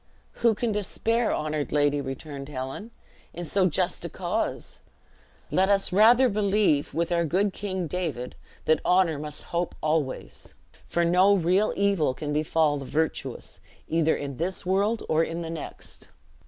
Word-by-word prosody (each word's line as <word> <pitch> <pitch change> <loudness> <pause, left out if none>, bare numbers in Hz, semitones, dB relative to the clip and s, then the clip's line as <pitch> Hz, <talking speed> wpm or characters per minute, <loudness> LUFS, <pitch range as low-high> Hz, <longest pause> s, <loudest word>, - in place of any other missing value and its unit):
"Who 230 -2 +4
can 230 +2 -1
despair, 225 +3 0
honored 150 -1 -2
lady," 145 -1 +2
returned 135 +1 -7
Helen, 135 - -6 0.5
"in 175 +1 -5
so 185 +3 +2
just 150 - 0
a - - -4
cause? - - -3 0.7
Let 190 +1 +3
us 195 -2 +2
rather 235 +6 +6
believe 200 -8 +1
with 170 +1 0
our 170 -1 +2
good 185 +5 +1
King 190 -3 -3
David, 155 -7 -3 0.3
that 155 -1 +3
'Honor 180 -5 +3
must 150 0 -3
hope 170 0 -1
always; 155 -4 -2 0.3
for 170 0 +1
no 185 +4 +5
real 185 +3 +2
evil 195 -10 +1
can 150 +1 -4
befall 155 0 +2
the 140 - -6
virtuous, 160 +4 -3 0.3
either 160 -1 +2
in 140 -2 -5
this 180 +4 -2
world 200 +5 +1
or 160 +1 +3
in 165 +1 -4
the 165 - -5
next!' 165 - -8
170 Hz, 155 wpm, -26 LUFS, 150-195 Hz, 0.7 s, rather